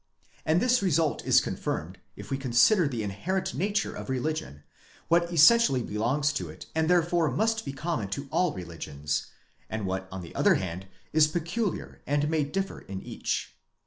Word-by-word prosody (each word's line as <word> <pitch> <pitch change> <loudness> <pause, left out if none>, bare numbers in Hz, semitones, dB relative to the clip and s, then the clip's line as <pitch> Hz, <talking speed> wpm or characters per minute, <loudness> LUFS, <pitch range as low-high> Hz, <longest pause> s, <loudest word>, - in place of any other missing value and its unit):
And 160 +2 +4
this 250 +1 +3
result 165 -5 +1
is - - +7
confirmed, - - -4 0.2
if - - -10
we 135 - 0
consider 135 - +4
the 120 -6 -3
inherent 170 - -2
nature 205 +3 -1
of - - -7
religion, 130 - -3 0.5
what 170 +1 +3
essentially 165 - +6
belongs 130 +8 0
to - - -3
it - - -10
and 160 0 +1
therefore 175 -2 +3
must 220 - 0
be - - -3
common 135 - -3
to 140 +9 -5
all 180 -2 +2
religions, 75 -5 -4 0.4
and 110 -2 -3
what 95 0 -3
on 95 -1 -6
the 85 - -10
other - - +4
hand 95 +1 -4 0.3
is 155 -1 +6
peculiar 175 +5 -3
and 145 +2 +1
may 160 -2 +2
differ 195 +7 -3
in 95 0 -7
each. - - -3
150 Hz, 170 wpm, -28 LUFS, 110-175 Hz, 0.5 s, is